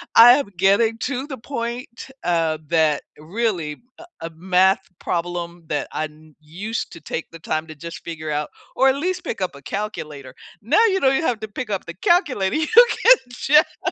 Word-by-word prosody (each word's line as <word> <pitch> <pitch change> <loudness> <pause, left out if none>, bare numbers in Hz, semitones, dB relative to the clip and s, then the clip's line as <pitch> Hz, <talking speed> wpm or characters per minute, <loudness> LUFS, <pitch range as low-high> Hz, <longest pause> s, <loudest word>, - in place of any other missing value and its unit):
I 240 +2 +10
am 275 -6 0
getting 210 +5 +3
to 265 +1 -3
the 265 - -6
point, 235 0 -6 0.2
uh, 165 -2 +1
that 155 -3 +2 0.2
really 170 -3 -2 0.2
a 340 - -11 0.2
a 165 - -4
math 190 +2 +2 0.2
problem 175 0 -4
that 145 - -2
I 155 - -2
n 155 0 -15
used 195 +9 -5
to 165 - -11
take 165 - -4
the 165 - -11
time 155 0 -2
to 155 - -10
just 165 +3 -9
figure 155 -2 -6
out 150 0 -2 0.3
or 265 - +4
at 265 - +2
least 370 0 -2
pick 225 - -5
up 180 -6 -2
a 140 - -12
calculator. 155 -10 -6 0.3
Now 450 - +3
you 385 - +1
don't 270 0 +3
even 320 - 0
have 220 - -6
to 220 - -4
pick 215 +2 -6
up 195 - -2
the 170 - -7
calculator. 260 - +2
You 310 0 0 0.3
can - - +6
just 300 +6 +2
190 Hz, 195 wpm, -21 LUFS, 160-245 Hz, 0.3 s, I